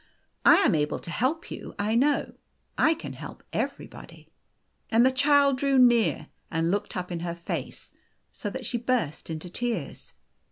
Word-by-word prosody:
I - - +8
am - - +3
able 150 -2 0
to 170 - -8
help 295 - -1
you, - - -8
I 210 +2 0
know. 280 +5 +2 0.4
I 320 +1 +3
can - - -8
help - - -10
everybody." - - -6 0.6
And 230 +1 +4
the 260 - +5
Child 280 0 +3
drew 275 -1 +2
near 230 - +4 0.2
and 165 +1 0
looked 200 -1 -2
up 180 0 -4
in 170 - -3
her 170 0 -4
face 170 0 -6 0.4
so 205 - -4
that 255 +4 -6
she 240 +2 -2
burst 230 - -1
into 160 +2 -5
tears. 230 - -4
230 Hz, 165 wpm, -27 LUFS, 170-260 Hz, 0.6 s, I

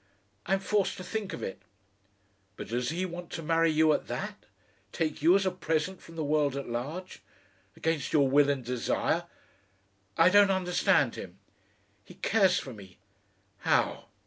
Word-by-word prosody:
"I'm 195 +2 +3
forced 205 -1 0
to 185 - -7
think 205 +2 -4
of - - -6
it." 95 0 -6 0.9
"But - - -8
does 120 +2 -1
he 180 +3 -2
want 175 -1 -7
to 165 - -5
marry 165 +1 +3
you 155 0 +4
at - - -2
that? - - -6 0.4
Take 155 -3 -2
you 170 +4 +6
as 195 0 +2
a 190 - +2
present 175 0 -2
from 165 - -14
the 160 - -2
world 145 -2 +1
at 140 - -5
large? 145 +11 -5 0.5
against 160 -4 -1
your 145 -3 +4
will 140 +2 +4
and 135 -4 -1
desire?... 125 -1 -1 0.9
I 165 +2 +6
don't 205 0 +6
understand 185 -2 +2
him." - - -9 0.7
"He - - -15
cares 190 -5 +3
for 130 - -5
me." 95 -4 -13 0.6
"How?" - - +1
165 Hz, 165 wpm, -29 LUFS, 140-185 Hz, 0.9 s, you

